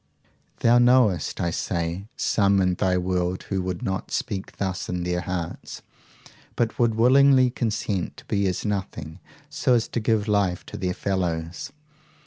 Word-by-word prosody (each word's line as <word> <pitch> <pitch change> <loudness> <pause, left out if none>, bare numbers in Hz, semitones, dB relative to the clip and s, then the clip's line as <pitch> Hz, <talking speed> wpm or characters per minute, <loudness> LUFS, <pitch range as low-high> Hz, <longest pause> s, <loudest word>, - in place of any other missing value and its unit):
Thou 120 +1 +5
knowest, 120 - +3
I 85 - 0
say, 85 +3 -3
some 100 -2 +2
in 90 -1 +2
thy 90 +1 +1
world 90 0 -1
who 95 -1 0
would 90 -1 -4
not 95 0 -3
speak 95 -1 -4
thus 95 -2 -3
in 90 -1 -2
their 90 0 -1
hearts, 90 -2 -5 0.7
but 115 -2 -1
would 115 -2 +3
willingly 130 +2 +5
consent 105 -6 -2
to - - -13
be 100 -1 0
as 90 +3 -2
nothing, 95 -5 -4 0.3
so 125 - +2
to 115 +1 -2
give 110 -1 +1
life 100 -4 +1
to - - -8
their 90 -1 -2
fellows. 85 -3 -2
95 Hz, 150 wpm, -24 LUFS, 90-110 Hz, 0.7 s, Thou